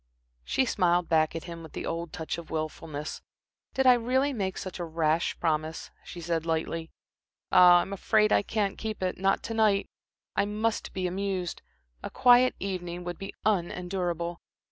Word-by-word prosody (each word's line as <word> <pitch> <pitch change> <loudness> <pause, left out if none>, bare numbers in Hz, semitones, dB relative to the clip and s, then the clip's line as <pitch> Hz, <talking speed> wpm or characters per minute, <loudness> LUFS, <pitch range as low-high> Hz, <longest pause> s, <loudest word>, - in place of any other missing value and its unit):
She 265 - +1
smiled 175 -6 +2
back 155 -1 +2
at 165 - -4
him 170 -1 -8
with 160 - -11
the - - -5
old 165 0 -3
touch 160 +1 -4
of 170 - -11
wilfulness. 155 -1 -4 0.5
"Did 265 - +2
I 255 - +9
really 260 +4 +1
make 190 -5 -2
such 185 -1 -6
a - - -2
rash 160 0 0
promise," 160 -1 -1
she 175 - -9
said, 165 -1 -1
lightly. 165 0 -2 0.6
"Ah, 175 -1 +8
I'm 195 - -5
afraid 215 +2 +2
I - - +5
can't 205 -1 -2
keep 215 -3 -4
it 185 -1 -2
not 195 +1 +2
to 230 - -4
night. 215 -3 +3 0.5
I - - +2
must 215 +2 -1
be 185 -1 -2
amused. 185 -1 -2 0.4
A - - -5
quiet 250 +1 +5
evening 180 -2 -4
would 175 0 -5
be 195 - -7
unendurable." 175 -3 -1
180 Hz, 170 wpm, -28 LUFS, 165-205 Hz, 0.6 s, I